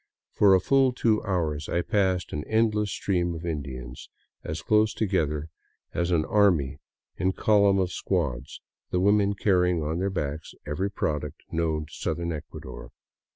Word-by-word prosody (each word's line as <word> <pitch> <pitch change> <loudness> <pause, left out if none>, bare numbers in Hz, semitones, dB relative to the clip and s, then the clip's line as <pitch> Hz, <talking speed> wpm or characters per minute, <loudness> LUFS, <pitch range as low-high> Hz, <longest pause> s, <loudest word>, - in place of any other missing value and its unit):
For 100 -2 +5
a - - +4
full 135 +5 +3
two 110 -3 +2
hours 80 -6 -1
I 85 0 0
passed 95 -2 0
an 75 - -3
endless 110 -2 +1
stream 90 -5 -1
of 80 +1 -7
Indians 65 -6 -6 0.3
as 80 +2 -5
close 110 0 +3
together 80 -7 -1 0.4
as 85 +1 0
an 80 -3 +2
army 90 -10 +2 0.4
in 95 +1 +1
column 100 -2 +4
of 90 -1 0
squads, 70 -8 -2 0.3
the 90 - 0
women 100 +1 +3
carrying 90 -5 +2
on 80 +3 -2
their 95 +1 0
backs 75 -4 -4
every 75 +7 -2
product 75 -6 -3
known 80 -2 -1
to 75 - -17
southern 85 0 -2
Ecuador. 75 -5 -8
90 Hz, 155 wpm, -26 LUFS, 75-100 Hz, 0.4 s, For